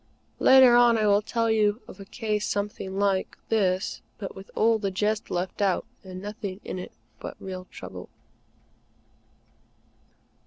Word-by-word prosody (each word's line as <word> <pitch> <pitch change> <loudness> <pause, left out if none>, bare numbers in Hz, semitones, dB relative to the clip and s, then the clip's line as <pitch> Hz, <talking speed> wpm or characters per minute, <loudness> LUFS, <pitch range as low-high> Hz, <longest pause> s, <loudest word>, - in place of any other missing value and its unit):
Later 260 -2 +7
on, 240 -1 +6
I 215 - +1
will 205 0 +4
tell 230 +1 0
you 215 0 +2
of 185 - -12
a 195 - -9
case 210 0 -2
something 200 -2 -3
like, 195 -1 0
this, 190 -4 0 0.2
but 195 - -6
with 195 0 -11
all 225 0 +3
the 200 -2 -1
jest 210 +3 -1
left 180 +3 -3
out 195 -1 +1 0.2
and 185 -1 -8
nothing 205 -2 -6
in 185 - -4
it 180 - -7 0.3
but - - -7
real 185 -1 -7
trouble. - - -9
205 Hz, 150 wpm, -26 LUFS, 190-220 Hz, 0.3 s, Later